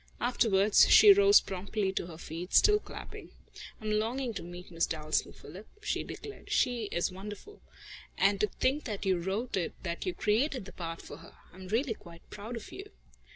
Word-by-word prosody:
Afterwards, 215 -4 +4
she 415 -2 +9
rose 405 +1 +7
promptly 195 +1 -3
to 175 - -3
her 165 -2 -10
feet, 170 +3 -6
still 420 0 +6
clapping. - - -10 0.5
"I'm 215 -1 -3
longing 230 +4 -1
to 195 - -5
meet 175 +1 -10
Miss 165 0 0
Dalstan, 155 -1 -1
Philip," 185 +9 -12 0.2
she - - -1
declared. 420 - -10
"She 240 -3 +1
is 175 -2 -1
wonderful. 210 - -10 0.6
And 200 0 +3
to 210 - +2
think 265 +8 -1
that 210 -5 -4
you 190 -2 +2
wrote 195 +8 -2
it 180 -4 -2
that 170 - -4
you 365 - -2
created 240 +2 0
the 190 - -11
part 165 -1 -6
for 145 - -10
her! 165 - -15 0.2
I - - -16
am 185 0 -10
really 230 +5 0
quite 170 -5 -15
proud 215 +4 -7
of 230 - -8
you." 395 +2 -9
205 Hz, 190 wpm, -30 LUFS, 180-245 Hz, 0.6 s, she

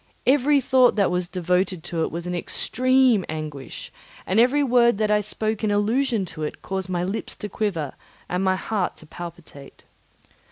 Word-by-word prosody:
Every 285 +2 +4
thought 255 -1 +4
that 200 -4 +2
was 180 0 -1
devoted 180 -1 0
to 165 -1 -3
it - - -1
was 170 +1 -5
an 180 - -3
extreme 255 +4 +2
anguish, 155 -3 -6 0.3
and 190 +4 +2
every 260 +5 +4
word 240 -4 +4
that 215 0 +1
I 210 0 +3
spoke 215 +1 -2
in 215 - +2
allusion 220 +2 +1
to 160 - -8
it 150 - -5
caused 190 -1 -3
my 175 -1 -1
lips 195 +5 -4
to 210 - -6
quiver, 180 -9 -2 0.3
and 180 +1 -1
my 190 0 +3
heart 195 -1 -2
to 160 - -12
palpitate. 165 -4 -11
195 Hz, 175 wpm, -23 LUFS, 175-235 Hz, 0.3 s, Every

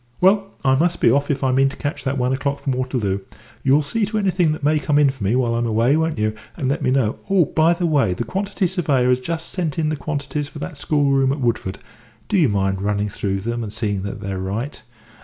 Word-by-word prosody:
Well, 195 +2 +4 0.2
I 130 - +5
must 170 +6 +1
be - - +5
off 140 +3 +1
if 140 -2 -1
I 130 - +2
mean 135 +1 +3
to - - -9
catch 145 +3 -4
that 135 +1 0
one 125 0 +1
o'clock 140 +1 -1
from 140 -1 -2
Waterloo. 125 -7 -1 0.4
You'll 140 +4 +3
see 225 +10 -1
to 215 +1 -2
anything 185 -5 +2
that 155 - -4
may 150 +1 +3
come 150 0 +1
in 145 -2 +5
for 135 -6 -9
me 100 +5 +2
while 125 -2 +1
I'm 120 0 0
away, 115 +5 +3
won't 160 -2 0
you, 110 0 0 0.2
and 140 -6 -1
let 140 - 0
me - - +1
know? 130 -5 +1
Oh, 190 -4 +4
by 160 +4 +3
the 175 0 -1
way, 140 - +2
the 120 - -2
quantity 195 - -2
surveyor 145 -9 +1
has 125 0 +3
just 165 +5 -4
sent 165 -6 -3
in 155 -2 +1
the 155 - -1
quantities 145 0 -3
for 150 - -11
that 150 +2 -6
schoolroom 140 -2 +2
at 140 - -2
Woodford 115 -6 -1 0.5
do - - 0
you 165 -9 +4
mind 95 -1 0
running 105 +1 0
through 95 -1 -2
them 120 +3 -3
and 110 -3 -5
seeing 105 -3 -1
they're 100 -1 -4
right? 105 +9 -4
135 Hz, 245 wpm, -21 LUFS, 115-155 Hz, 0.5 s, I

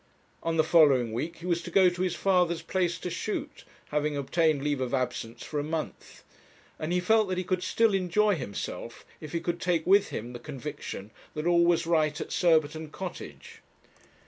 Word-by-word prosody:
On 165 0 -1
the 160 - +5
following 140 -8 +4
week 155 +9 -3
he 170 - -10
was 170 -1 0
to - - -7
go 190 -2 +5
to 175 0 -1
his 185 -2 0
father's 180 -4 +2
place 175 -1 0
to 180 - -5
shoot, 285 - -4 0.3
having 150 0 0
obtained 155 0 +1
leave 145 -2 0
of 130 +1 0
absence 125 -3 -3
for 150 - -3
a - - -1
month; 155 +1 -5 0.6
and 155 +2 -3
he 180 - +2
felt 215 +3 +3
that 185 - -1
he 185 - -1
could 185 0 -1
still 220 +3 +2
enjoy 195 +3 +2
himself 130 - -6
if 155 - -9
he 170 - -1
could 170 +1 -3
take 170 -3 +1
with 200 +2 +5
him 120 +3 -5
the 120 - -7
conviction 140 -7 -7 0.2
that 150 +1 -3
all 170 0 +4
was 170 -1 +2
right 155 -3 +1
at - - -6
Surbiton 160 -2 +2
Cottage. 185 +3 -8
165 Hz, 195 wpm, -28 LUFS, 150-180 Hz, 0.6 s, the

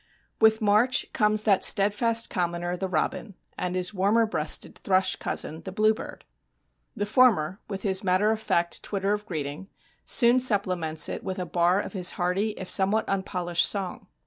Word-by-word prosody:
With 220 +1 +4
March 215 +5 +3
comes 215 0 +1
that 200 -3 +2
steadfast 225 +3 +2
commoner 175 -1 -3
the 190 +2 -4
robin 185 +4 -3 0.2
and 180 0 -3
his 180 +2 -2
warmer 205 +4 +2
breasted 155 -8 -2
thrush 185 -1 +2
cousin, 160 +2 -3
the 190 - -8
bluebird. 215 +2 -1 0.7
The 205 - -2
former, 205 -6 +2
with 195 -2 -6
his 190 -1 0
matter 190 +3 +2
of 220 0 -3
fact 170 -5 -1
twitter 200 0 -2
of 210 0 -5
greeting, 150 +2 -5 0.4
soon 240 0 +4
supplements 185 -10 +1
it - - -6
with 185 - -5
a 180 - -4
bar 175 +2 +1
of - - -6
his 180 -3 +2
hearty 190 +5 -1
if 190 - -7
somewhat 195 +4 +2
unpolished 180 -3 +1
song. 195 -3 -4
195 Hz, 165 wpm, -25 LUFS, 180-215 Hz, 0.7 s, With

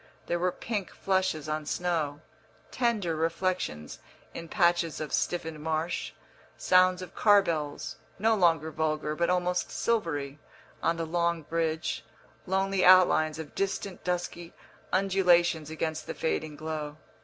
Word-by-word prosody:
There 175 - -1
were 180 +1 +1
pink 205 -1 -4
flushes 190 -6 -1
on 155 -1 -3
snow, 160 -5 -1 0.5
"tender" 215 -9 0
reflexions 165 - -2 0.3
in 165 - -7
patches 170 -3 +2
of 155 -1 -5
stiffened 160 -3 -1
marsh, 160 +2 -2 0.5
sounds 185 0 +4
of 180 - -10
car 205 -2 +5
bells, 155 -5 -3 0.2
no 225 +3 +3
longer 165 -6 +2
vulgar, 155 -1 -1
but 170 +2 +1
almost 180 0 0
silvery, 155 -11 -1 0.4
on 165 0 +1
the 165 - -2
long 170 0 0
bridge, 160 +1 -2 0.4
lonely 195 0 +1
outlines 180 -4 +6
of 160 -3 -8
distant 195 -1 -3
dusky 175 -1 -3 0.4
undulations 180 -5 +3
against 160 0 -3
the - - -5
fading 155 -1 -2
glow. 155 -1 -5
170 Hz, 130 wpm, -28 LUFS, 155-185 Hz, 0.5 s, outlines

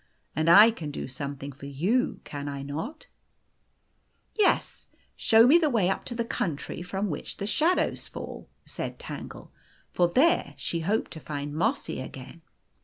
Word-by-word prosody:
" - - -43
And 160 +2 +2
I 210 +7 +9
can 165 -9 -6
do 145 - -5
something 140 +1 -6
for 140 +1 -10
you, 185 - 0
can 145 -1 -6
I 140 -1 -5
not? 160 - -5 0.5
' - - -45
" - - -44 0.2
Yes 425 -3 +1 0.3
show 225 +1 +5
me 300 +7 +7
the 315 -3 +2
way 205 -8 +2
up - - -3
to 240 - -4
the 235 0 -1
country 165 -6 -3
from 190 +2 -2
which - - -6
the 200 - -3
shadows 320 - +1
fall," - - -8 0.2
said - - -5
Tangle. - - -8 0.4
For 175 - +3
there 290 - +3
she 170 - -2
hoped 200 +7 -1
to 160 - -8
find 145 -1 -5
Mossy 225 - -1
again. 130 +5 -9
175 Hz, 175 wpm, -27 LUFS, 145-230 Hz, 0.5 s, I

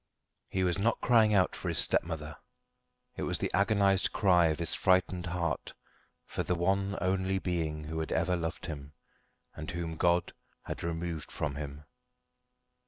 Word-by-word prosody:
He 95 - 0
was 90 +1 +1
not 115 +3 +1
crying 115 -3 +4
out 95 -2 +3
for - - -4
his - - -1
stepmother. 80 -2 +2 0.8
It - - -4
was - - -1
the - - -2
agonised 100 -1 +3
cry 90 -4 +4
of 80 -1 0
his 85 -1 +2
frightened 90 -1 +2
heart 85 -1 -2 0.5
for - - -3
the 90 - 0
one 95 +3 0
only 95 +1 0
being 80 -5 -2
who 80 +1 -4
had 80 - -3
ever 90 +2 +1
loved 85 +1 -4
him, 75 -3 -7 0.6
and 80 -1 -7
whom 85 -1 -4
God 85 0 +2 0.3
had - - -6
removed 85 -1 -4
from 75 -2 -2
him. 70 0 -7
85 Hz, 160 wpm, -30 LUFS, 80-95 Hz, 0.8 s, crying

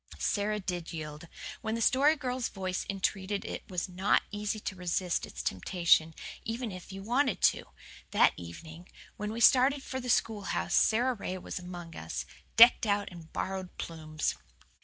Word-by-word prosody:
Sara 210 +1 0
did 180 -4 -4
yield. 155 0 -7 0.3
When 220 0 -2
the - - -2
Story 280 +7 +5
Girl's 255 -4 -2
voice 185 -2 -3
entreated 195 +1 -1
it - - -6
was 180 -3 -2
not 185 +2 +2
easy 205 +1 -2
to 190 - -4
resist 180 -1 -1
its - - -7
temptation, 165 - +2 0.3
even 230 0 -3
if 185 0 -9
you 195 0 -7
wanted 245 -2 +1
to. - - -9 0.4
That - - +5
evening, 160 - -10 0.3
when 210 0 -3
we 230 +2 -4
started 270 +3 +5
for 260 - -4
the 250 -1 -5
schoolhouse, 215 -4 0
Sara 245 +4 +4
Ray 185 -4 -4
was 180 - -6
among 175 -2 -8
us, - - -5 0.3
decked 235 -1 +8
out 205 0 +1
in 170 -2 -11
borrowed 190 -1 -4
plumes. 155 -2 -3
195 Hz, 160 wpm, -30 LUFS, 175-225 Hz, 0.4 s, decked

